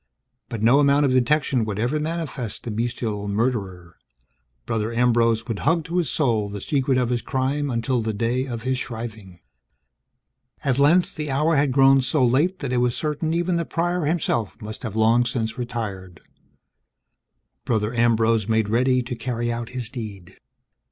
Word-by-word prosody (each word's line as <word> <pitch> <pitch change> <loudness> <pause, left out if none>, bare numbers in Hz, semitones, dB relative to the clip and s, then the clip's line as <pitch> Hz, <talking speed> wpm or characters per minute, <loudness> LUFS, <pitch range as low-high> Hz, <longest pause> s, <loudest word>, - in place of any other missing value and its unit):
But 110 -2 -4
no 125 +5 +5
amount 145 0 +4
of 135 - +2
detection 130 0 +2
would 105 -2 -3
ever 125 +8 0
manifest 150 -8 -4
the 115 - -4
bestial 110 -2 -3
murderer. 100 -6 -2 0.7
Brother 110 0 -1
Ambrose 115 -1 +2
would 115 -4 -3
hug 165 +2 +1
to 170 +2 -3
his 170 -7 +1
soul 115 -7 0
the 100 0 -6
secret 135 +3 0
of 125 -2 +1
his 120 -1 0
crime 135 +4 -1
until 120 0 0
the 110 0 -1
day 120 +5 -1
of 115 -3 -5
his 130 0 -1
shriving. 110 - -7 1.2
At 135 -2 +1
length, 165 +6 +4
the 150 -1 -4
hour 150 +4 +2
had 140 -1 +2
grown 135 0 +5
so 130 +1 +1
late 150 +10 +2
that 135 -3 -2
it - - +1
was 120 -1 +1
certain 155 +1 -1
even 175 +1 0
the 170 - 0
Prior 175 0 +1
himself 145 - -1
must 110 0 -8
have 110 -5 -5
long 115 +2 +4
since 115 -1 -3
retired. 100 -7 -5 1.4
Brother 110 0 0
Ambrose 115 -2 +2
made 110 -2 +1
ready 125 +3 +2
to 120 +1 -5
carry 120 0 -2
out 115 0 -5
his 125 -3 -4
deed. 105 -7 -8
120 Hz, 170 wpm, -23 LUFS, 110-140 Hz, 1.4 s, no